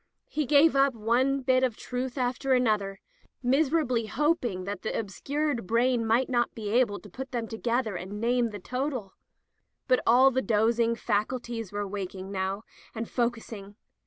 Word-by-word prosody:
He 300 -2 -1
gave 290 +2 +5
up 275 -2 +3
one 250 +5 +1
bit 255 0 +2
of 245 -4 0
truth 250 +1 -4
after 255 +1 0
another, 210 -6 +1 0.4
miserably 265 -3 +2
hoping 240 - 0
that 200 0 -5
the - - -2
obscured 260 +3 -2
brain 235 +1 +2
might 235 +4 +3
not 240 -2 0
be 215 -2 -4
able 230 -4 +2
to - - -12
put 265 +8 -7
them 235 -3 -2
together 230 -1 -1
and 190 +4 -6
name 240 +1 +1
the 210 - -7
total. 250 -1 -4 0.7
But 255 -1 +3
all 255 +3 +6
the 260 0 +1
dozing 230 0 +2
faculties 230 0 -2
were 205 0 -3
waking 190 -1 -6
now, 195 +2 -2 0.3
and 225 0 -3
focusing. 225 -4 -3
235 Hz, 160 wpm, -28 LUFS, 210-260 Hz, 0.7 s, all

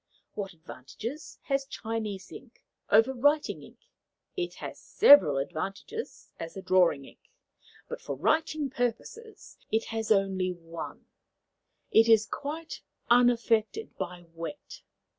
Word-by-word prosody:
What 195 -2 -5
advantages 210 - -8
has 275 -1 -1
Chinese 220 -6 -5
ink 255 -3 -13 0.3
over 225 +5 +5
writing 290 +4 +1
ink? - - -16 0.5
It 360 -2 -3
has - - -8
several 190 - +6
advantages 195 - -5
as 165 +3 -7
a - - -5
drawing 180 -7 +3
ink, - - -16 0.7
but 485 - -6
for - - -4
writing 310 -3 0
purposes 260 - -4
it 220 +1 +1
has 225 -1 -2
only 190 -2 +2
one: 165 -1 -9 0.9
it 225 +1 +5
is 220 -1 +6
quite 305 +8 -6 0.3
unaffected 240 - +3
by 180 -2 -6
wet. 165 - -8
225 Hz, 120 wpm, -29 LUFS, 185-280 Hz, 0.9 s, several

